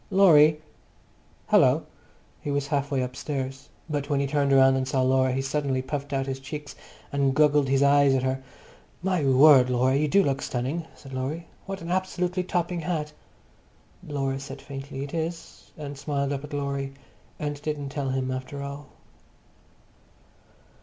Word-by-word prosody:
"Laurie!" 155 -6 +6 0.9
"Hallo!" - - +4 0.6
He - - -5
was 140 0 0
half 140 -1 -1
way 135 -3 0
upstairs, 135 +1 -5 0.2
but 145 -2 -3
when 145 -2 +1
he 140 - +1
turned 140 0 +1
round 135 -1 +6
and 130 0 -1
saw 130 -1 +1
Laura 130 0 +3
he 135 +1 -1
suddenly 135 -2 -1
puffed 140 +1 -4
out 135 -1 0
his 135 -1 -4
cheeks 145 +2 -7 0.4
and 140 -1 +1
goggled 150 -2 +4
his 135 +1 +3
eyes 140 -1 +5
at 130 - 0
her. 130 0 -1 0.6
"My 185 -4 +1
word, 135 -1 +7
Laura! 125 +1 +2
You 150 +2 +2
do 195 +7 +4
look 135 -1 0
stunning," 135 +7 -3
said 135 -2 -12
Laurie. 140 +6 -3 0.2
"What 195 -1 -5
an 170 - -5
absolutely 185 0 -1
topping 175 -1 -1
hat!" 155 -2 -3 0.9
Laura 135 -2 -2
said 140 - -8
faintly 135 -1 -7
"Is 165 +3 -6
it?" 155 - -8
and 145 0 -6
smiled 140 0 -2
up 140 0 -4
at 150 - -9
Laurie, 140 -1 -3 0.4
and 145 -1 -4
didn't 145 -2 -3
tell 140 -1 -3
him 130 0 -1
after 130 +2 -5
all. 140 0 -7
140 Hz, 165 wpm, -26 LUFS, 135-150 Hz, 0.9 s, word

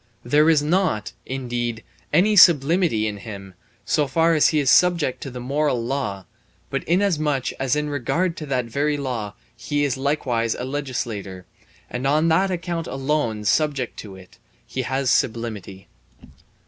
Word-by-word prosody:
There 150 +6 +4
is 155 -3 +4
not, 160 - 0 0.2
indeed, 120 -3 -3 0.3
any 195 +7 +3
sublimity 165 - +5
in 105 -1 -3
him, 100 -2 -9 0.3
so 150 -2 +1
far 165 +5 +2
as 155 - +4
he 155 - +1
is 140 -3 +3
subject 175 -7 +3
to 135 - -5
the 125 -1 -8
moral 140 +1 0
law; 120 -8 -3 0.5
but - - -2
inasmuch 155 -7 +1
as 135 0 +1
in 150 0 -1
regard 165 +6 -1
to 155 - -6
that 130 -3 -1
very 145 +5 -1
law 120 -7 -4 0.2
he 145 +5 -2
is 140 -2 0
likewise 130 -5 0
a - - -5
legislator, 120 -9 -4 0.4
and 125 +2 -3
on 155 +4 +3
that 185 +4 +3
account 170 -2 -3
alone 135 -6 -2
subject 140 0 0
to 100 -3 -9
it, 95 -1 -16 0.3
he 130 - -4
has 130 +1 0
sublimity. 105 -5 -2
135 Hz, 155 wpm, -22 LUFS, 115-155 Hz, 0.5 s, sublimity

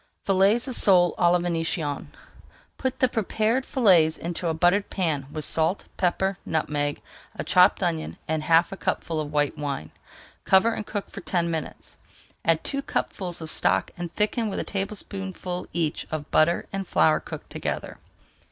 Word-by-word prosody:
FILLETS 200 +6 +3
OF 255 - -4
SOLE 180 -3 +5
À 175 - +5
LA 180 - +5
VÉNITIENNE 165 -4 -2
I - - -22 0.6
Put 260 -1 -2
the 255 - +6
prepared 225 +2 0
fillets 180 - +4
into 170 +1 -4
a 165 - +1
buttered 180 +5 +2
pan 160 -8 -1
[Page - - -18
393] - - -14
with 155 -2 -1
salt, 160 +5 +1
pepper, 190 +1 0
nutmeg, 145 -2 -1 0.3
a - - -4
chopped 185 +1 +4
onion, 165 -3 -2
and 160 0 -1
half 165 +2 +3
a 195 - -6
cupful 165 -3 -2
of 150 -1 -4
white 145 -1 0
wine. 140 - -4 0.5
Cover 195 +5 +4
and 210 - -5
cook 205 -2 -4
for 200 - -8
ten 170 -1 -1
minutes. 160 -2 -6 0.5
Add 165 -1 +2
two 275 -1 -1
cupfuls 180 -9 -3
of 160 -1 -6
stock - - +1
and 175 -1 -6
thicken 215 +1 +1
with - - -3
a - - -1
tablespoonful 195 -2 -4
each 165 -3 -1
of 155 -2 -5
butter 165 +2 +3
and 195 -1 -3
flour 155 - +3
cooked - - -9
together. - - -4
175 Hz, 175 wpm, -25 LUFS, 160-195 Hz, 0.6 s, the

